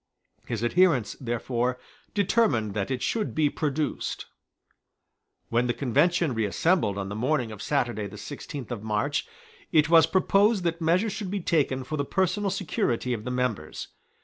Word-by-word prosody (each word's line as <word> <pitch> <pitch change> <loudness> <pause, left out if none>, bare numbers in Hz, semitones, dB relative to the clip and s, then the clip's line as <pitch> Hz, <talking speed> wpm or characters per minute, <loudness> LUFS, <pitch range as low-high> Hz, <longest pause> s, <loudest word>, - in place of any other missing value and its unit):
His 115 -1 -3
adherents, 140 - +3
therefore, 120 +1 -1 0.4
determined 185 - +2
that 100 -2 -2
it 130 -2 -2
should 220 -2 -1
be 150 -2 +2
produced. 150 0 -2 1.2
When 120 +1 +2
the 120 - 0
Convention 160 +4 +2
reassembled 110 - +1
on 100 -1 -3
the 100 - -5
morning 125 0 0
of 105 -1 -8
Saturday 120 -6 -1
the 105 +1 -10
sixteenth 140 +2 -7
of 115 -4 -4
March, 105 -1 -1 0.4
it 155 -1 +4
was 165 -2 +7
proposed 195 +3 +3
that 170 0 -1
measures 185 +6 +2
should 210 -4 -4
be 200 +1 -2
taken 145 -7 +1
for 155 +4 -4
the 140 - 0
personal 190 +6 0
security 155 - -1
of 110 -2 -5
the - - -2
members. 125 -11 -2
135 Hz, 155 wpm, -26 LUFS, 115-175 Hz, 1.2 s, was